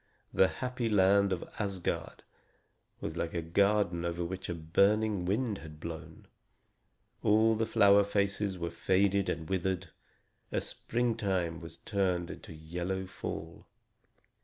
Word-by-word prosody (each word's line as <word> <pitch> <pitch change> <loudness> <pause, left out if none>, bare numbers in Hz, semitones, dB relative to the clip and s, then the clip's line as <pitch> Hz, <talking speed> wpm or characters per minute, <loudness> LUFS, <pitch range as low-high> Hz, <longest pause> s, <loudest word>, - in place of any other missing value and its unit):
The 95 - +5
happy 125 +2 -3
land 100 -1 +4
of 90 - -2
Asgard 100 -4 -3 0.8
was 80 - -4
like 85 0 -3
a 85 - 0
garden 100 0 +2
over 85 0 -2
which 95 +1 -5
a 85 - -2
burning 100 +4 +2
wind 105 +3 0
had 75 -1 -11
blown, 80 0 -8 1.0
all 110 +2 +4
the 110 0 0
flower 100 -1 +6
faces 100 -1 0
were 85 -1 -3
faded 95 +3 +2
and 80 -1 -3
withered, 95 0 -1 0.6
and - - 0
springtime 100 -8 -1
was 85 - -9
turned 90 -4 -1
into - - -10
yellow 85 +4 -4
fall. 80 -3 -7
95 Hz, 130 wpm, -31 LUFS, 85-100 Hz, 1.0 s, flower